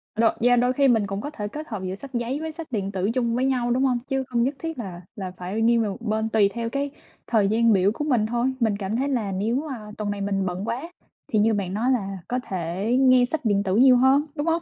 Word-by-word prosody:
đôi 225 +1 +4
yeah, 245 +1 +4
đôi 250 +1 +2
khi 275 +1 +3
mình 225 -5 +3
cũng 195 +1 -4
có 290 - -4
thể 210 -9 -5
kết 305 +8 -7
hợp 210 -5 -5
giữa 185 0 -3
sách 275 +6 -11
giấy 240 +4 -2
với 320 0 -4
sách 320 0 -8
điện 200 -3 -2
tử 190 +1 -1
chung 235 -2 0
với 255 - +1
nhau, 250 -3 +1
đúng 255 +2 +2
hông? 255 -3 +2
Chứ 270 0 0
không 240 -2 +1
nhất 270 +4 0
thiết 325 -1 -5
là 185 -7 -6
là 190 -3 -5
phải 185 +5 -3
nghiêng 230 +1 +4
về 220 - 0
một 200 - -7
bên, 220 -1 -1
tùy 215 -3 +3
theo 230 -1 -3
cái 280 +3 -2 0.4
thời 215 -4 +3
gian 225 +2 +3
biểu 195 0 +3
của 295 - -4
mình 250 -8 +2
thôi, 240 +3 0
mình 220 -4 +1
cảm 200 +1 -3
thấy 270 +4 0
là 230 -7 -1
nếu, 230 +10 -1
à, 255 - -5 0.2
tuần 210 -1 -2
này 205 0 -4
mình 195 -1 -1
bận 185 +2 -3
quá 255 +9 -4 0.4
thì 215 - +1
như 220 +2 +3
bạn 195 -3 -2
nói 235 +6 +1
là 195 -6 -1
có 250 - -1
thể 180 +2 -3
nghe 255 -2 +6
sách 280 +2 -4
điện 200 -2 +2
tử 190 -1 0
nhiều 255 +2 +7
hơn, 265 +4 +4
đúng 290 +2 -3
hông? 330 +1 +2
230 Hz, 280 wpm, -24 LUFS, 200-260 Hz, 0.4 s, nhiều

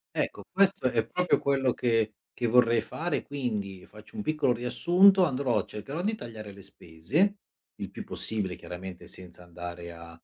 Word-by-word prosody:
Ecco, - - -2
questo 190 -8 +3
è 115 -1 +1
proprio 180 +6 +2
quello 135 -2 +2
che 115 -3 +1 0.2
che 120 - -1
vorrei 115 0 +5
fare 165 +10 -2
quindi 105 -9 -4
faccio 105 - -14
un 215 - -3
piccolo 155 -7 +2
riassunto, 180 - +5
andrò 135 -4 +1
cercherò 135 - -5
di 215 +4 +1
tagliare 110 - -8
le 100 0 -13
spese, 100 - 0 0.4
il - - -6
più - - -7
possibile, 100 -5 -3
chiaramente 90 0 -8
senza 90 -1 -11
andare 85 0 -8
a 85 0 -11
115 Hz, 160 wpm, -28 LUFS, 95-155 Hz, 0.4 s, vorrei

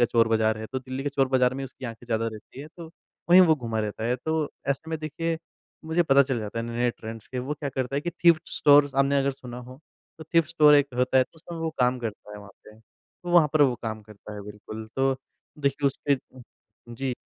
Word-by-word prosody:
का 120 - +6
चोर 115 -1 +3
बाज़ार 110 -1 +2
है। 110 - -6
तो 130 - -4
दिल्ली 130 +1 -6
के 145 - -1
चोर 135 -1 +1
बाजार 130 -1 +2
में 135 0 -4
उसकी 130 - -11
आँखें 115 0 -7
ज़्यादा 115 -1 0
रहती 110 +5 -11
है 150 - -8
तो 170 - -8 0.4
वहीं 180 +2 +9
वो 165 -3 +6
घुमा 115 -5 -3
रहता 105 +1 -4
है। 125 +2 +1
तो 160 +2 -1 0.2
ऐसे 150 +4 -2
में 160 - -2
देखिए 165 +2 -3 0.5
मुझे 160 +2 +2
पता 140 -3 +5
चल 130 -3 -2
जाता 105 +2 -5
है 115 - -2
नए-नए 120 +1 0
ट्रेंड्स 110 -2 -9
के, 130 - -6
वो 135 +4 -3
क्या 145 -1 -4
करता 130 0 -3
है - - +1
कि 175 +3 -3
थ्रिफ्ट 170 -1 +3
स्टोर 145 -1 +5
आपने 140 +1 +3
अगर 140 0 +1
सुना 125 -2 -9
हो, 125 +2 -11 0.4
तो 160 - -9
थ्रिफ्ट 165 -1 +2
स्टोर 150 -3 +6
एक 145 -1 +5
होता 130 +1 +3
है 130 - +5
तो - - -28
उसमें 170 +1 -9
वो 160 0 -2
काम 125 0 +3
करता 110 -3 -6
है 105 - -8
वहाँ 100 -1 -12
पे, 105 0 -16
तो 175 +9 -13
वहाँ 170 -4 +6
पर 155 -2 +5
वो 130 -3 +3
काम 110 -1 -4
करता 105 0 -12
है, 105 - -7
बिल्कुल। 105 +1 -9
तो 135 0 +2 0.4
देखिए 140 0 0
उसके 140 +1 +1 0.8
जी, 130 +1 -2
130 Hz, 245 wpm, -26 LUFS, 115-150 Hz, 0.8 s, वहीं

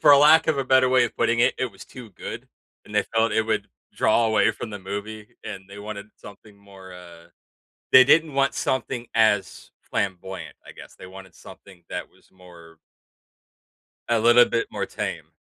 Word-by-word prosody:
for 150 - +6
a 140 - +7
lack 155 +3 +6
of 155 -3 +1
a 135 - -1
better 130 0 +4
way 130 -1 +4
of 120 - -6
putting 115 0 +1
it, - - +3
it 130 - 0
was 95 - -13
too 125 -4 -12
good, 95 - -9 0.4
and 105 - -13
they 105 - +3
felt 115 -1 +2
it 110 - +2
would 110 -2 -2 0.3
draw 115 +1 +2
away 110 0 +3
from 110 +1 -8
the 105 - -7
movie, 105 +2 -7 0.2
and 105 -4 -8
they 100 +1 -11
wanted 105 0 -8
something 105 0 -15
more, 100 -2 -15
uh 85 -2 -14 0.6
they 130 - +9
didn't 155 +3 +3
want 135 0 +1
something 130 -2 -3
as 110 -3 +1
flamboyant, 95 -1 -5
I - - -11
guess. - - -14
They - - -12
wanted 95 0 -13
something 95 -3 -16
that - - -5
was - - -27
more 85 -3 -17 1.3
a 115 -1 +2
little 120 +2 +6
bit 115 - -2
more - - -4
tame. - - -6
110 Hz, 190 wpm, -23 LUFS, 95-120 Hz, 1.3 s, they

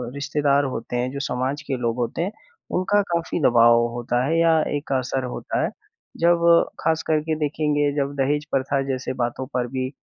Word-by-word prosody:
रिश्तेदार 145 0 +1
होते 115 +2 -5
हैं, 125 +1 -1
जो 140 - -5
समाज 130 +4 -2
के 135 -2 -1
लोग 120 -1 -1
होते 120 +6 -2
हैं, 190 +4 -1 0.4
उनका 205 +3 +2
काफ़ी 170 0 -1
दबाव 120 -3 +6 0.2
होता 120 +1 -1
है 165 +4 +1
या 165 -1 +4 0.2
एक 145 - -8
असर 130 0 -1
होता - - -2
है। - - 0 0.5
जब 170 0 +3 0.3
खास 160 0 +1
करके 155 0 +1
देखेंगे 150 -1 0
जब 140 0 -1
दहेज 145 +2 0
प्रथा 135 +1 0
जैसे 130 -1 -2
बातों 120 +2 -3
पर 125 -1 0
भी 130 0 -3
140 Hz, 180 wpm, -23 LUFS, 130-155 Hz, 0.5 s, दबाव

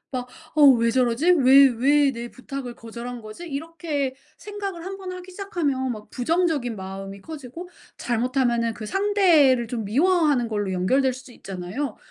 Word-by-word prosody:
막 250 0 -3 0.3
'어 300 - +5
왜 235 -4 +5
저러지? 255 +7 +2
왜 275 -3 +7
왜 280 +2 +4
내 235 0 -6
부탁을 255 -1 -7
거절한 235 +1 -8
거지?' 215 +11 -9
이렇게 290 -2 -3 0.2
생각을 400 -4 -6
한번 385 -1 -6
하기 365 0 -9
시작하면 305 - -2
막 215 -2 -8
부정적인 290 -4 0
마음이 195 +1 -7
커지고 315 - -9 0.3
잘못하면은 240 -1 0
그 215 -1 -8
상대를 335 - +3
좀 225 -2 -4
미워하는 290 - +2
걸로 205 -3 -2
연결될 255 +9 +2
수도 260 0 -12
있잖아요. 195 +7 -5
260 Hz, 330 characters per minute, -24 LUFS, 235-330 Hz, 0.3 s, 왜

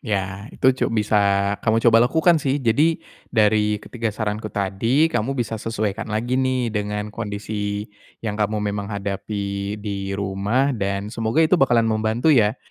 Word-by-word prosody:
Ya, 100 -1 -3
itu 130 - +2
cu 130 - -1
bisa, 105 -1 +1 0.4
kamu 110 -1 +2
coba 115 -1 +6
lakukan 165 0 +3
sih. 140 0 0
Jadi, 145 +6 +2 0.3
dari 105 -1 +2
ketiga 115 +2 -4
saranku 110 0 -3
tadi, 115 +11 +1
kamu 135 +6 -1
bisa 115 -3 -2
sesuaikan 110 -1 -3
lagi 120 +5 0
nih. 130 -3 0
Dengan 105 0 -3
kondisi 105 -1 -4 0.4
yang 105 - -1
kamu 105 0 0
memang 100 -1 -3
hadapi 100 0 -3
di 100 -2 -4
rumah, 100 +8 0
dan 100 -1 -3
semoga 115 +8 +1
itu 175 0 +3
bakalan 120 -4 +4
membantu 110 +6 +2
ya. 110 -2 +3
110 Hz, 150 wpm, -22 LUFS, 100-120 Hz, 0.4 s, coba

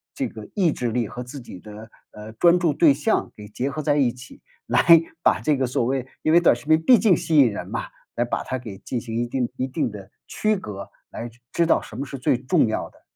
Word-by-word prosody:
这 - - -2
个 110 -1 -11
意 180 -6 +3
志 120 -2 -3
力 115 -2 -1
和 125 0 -7
自 135 +3 -9
己 95 -6 -11
的， 110 +2 -12 0.2
呃， 105 +1 -11
专 170 +9 +4
注 170 -4 +1
对 155 0 +5
象 145 - 0
给 105 -1 -11
结 125 +6 -3
合 150 +2 -5
在 145 -1 +2
一 130 -4 +3
起， 125 +1 -14 0.2
来 - - +2 0.4
把 - - +3
这 150 - +2
个 130 - 0
所 120 -1 -1
谓 130 0 -2 0.2
因 155 - +2
为 170 - +7
短 170 - +5
视 120 - -13
频 155 +1 +3
毕 240 +8 +6
竟 195 -2 +4
吸 160 0 0
引 130 -5 +6
人 100 - -6
嘛， - - -4 0.3
来 120 - 0
把 120 - -3
它 130 - -3
给 110 -6 -9
进 120 +3 -4
行 115 -1 -7
一 120 +1 -1
定 125 0 -2
一 130 - -1
定 130 - -2
的 100 -2 -11 0.2
区 215 0 0
隔， 100 - -7 0.2
来 120 - -7 0.2
知 170 - +1
道 165 - +3
什 - - -11
么 140 - -3
是 135 - -7
最 125 - +1
重 130 +3 +2
要 110 - -3
的。 - - -25
125 Hz, 275 characters per minute, -23 LUFS, 115-155 Hz, 0.4 s, 为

